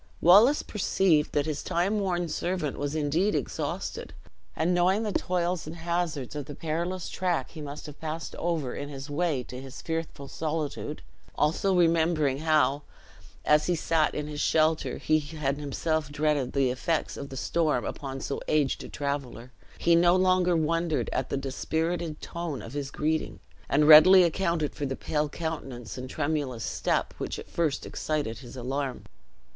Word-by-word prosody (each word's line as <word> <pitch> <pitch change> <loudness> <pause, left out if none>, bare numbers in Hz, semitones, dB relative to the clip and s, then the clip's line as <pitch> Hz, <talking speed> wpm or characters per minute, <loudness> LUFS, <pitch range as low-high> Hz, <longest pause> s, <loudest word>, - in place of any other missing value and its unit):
Wallace 210 - +6
perceived 185 -6 +2
that 145 - +1
his 155 -2 -2
time 195 +5 0
worn 175 -3 0
servant 170 -3 -2
was 145 +1 -2
indeed 155 +7 +1
exhausted; - - -3 0.4
and 170 +3 +1
knowing 185 +5 +3
the 215 - -1
toils 180 -3 -1
and 160 - -6
hazards 170 -5 -2
of 145 -2 -4
the 145 - -8
perilous 170 +3 -3
track 175 -8 -1
he 160 - -9
must 145 0 -7
have 150 -1 -10
passed 160 0 -4
over 160 -7 -1
in 145 - -5
his 140 +1 -7
way 150 -4 0
to 125 +1 -8
his 135 +1 -9
fearful 160 -4 -4
solitude, 155 0 -4 0.3
also 175 +6 +2
remembering 165 -5 +3
how, 155 -2 +2 0.6
as 150 0 +4
he 175 - +2
sat 160 -1 +1
in 150 - -2
his 150 -1 -4
shelter, 160 0 +2
he 155 0 +2
had 145 -2 -3
himself 150 +1 -1
dreaded 150 -3 0
the 135 -3 +2
effects 155 +5 -1
of 140 - -7
the 135 - -7
storm 155 -4 0
upon 135 -2 -5
so 140 - -4
aged 150 -3 +1
a - - -9
traveler, 140 -4 -4 0.3
he 170 - +3
no 175 +1 +5
longer 185 -1 +3
wondered 165 0 0
at 130 - -1
the - - -1
dispirited 160 +4 -2
tone 165 -9 -5
of 115 - -9
his 145 -2 -3
greeting, 155 +2 -1 0.3
and 150 +1 +3
readily 180 +5 +10
accounted 170 -3 0
for 145 - -3
the 135 - -3
pale 150 +1 -1
countenance 140 -8 -5
and 130 0 -6
tremulous 145 -7 -2
step - - -1
which - - -3
at - - -8
first 160 -5 -1
had - - -8
excited 145 -8 -2
his 130 0 -11
alarm. 135 +1 -3
155 Hz, 170 wpm, -28 LUFS, 140-170 Hz, 0.6 s, readily